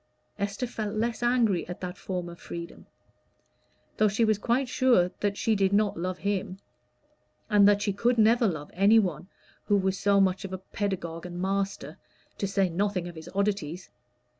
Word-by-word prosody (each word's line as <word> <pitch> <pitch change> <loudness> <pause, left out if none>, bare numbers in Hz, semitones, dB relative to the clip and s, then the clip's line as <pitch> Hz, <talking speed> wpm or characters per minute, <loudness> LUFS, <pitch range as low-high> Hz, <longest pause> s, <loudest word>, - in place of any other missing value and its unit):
Esther 200 +5 -2
felt 220 -3 -4
less 230 +2 -1
angry 240 -7 +2
at 175 - -7
that 180 0 -5
form 180 -2 -4
of 170 0 -10
freedom; 170 0 -8 1.1
though 215 - +4
she 210 +3 +2
was 215 -2 +2
quite 250 +4 +1
sure 245 -8 +3
that 200 -1 -1
she 225 - +1
did 195 -1 +2
not 205 0 +2
love 180 +2 -3
him, 195 -2 -2 0.9
and 205 -1 +6
that 205 0 +3
she 200 - 0
could 235 +5 +1
never 230 +1 +4
love 155 -6 -4
any 200 +5 +5
one 180 -5 0 0.4
who 205 - +3
was 190 0 0
so 200 -1 +3
much 190 +1 +2
of 195 - -6
a 190 - -3
pedagogue 180 -3 -4
and 175 0 -7
master, 195 +1 -2 0.4
to 200 - 0
say 195 -1 +1
nothing 180 0 -1
of 175 - -8
his 160 -1 -10
oddities. 195 -4 -2
200 Hz, 180 wpm, -27 LUFS, 180-215 Hz, 1.1 s, and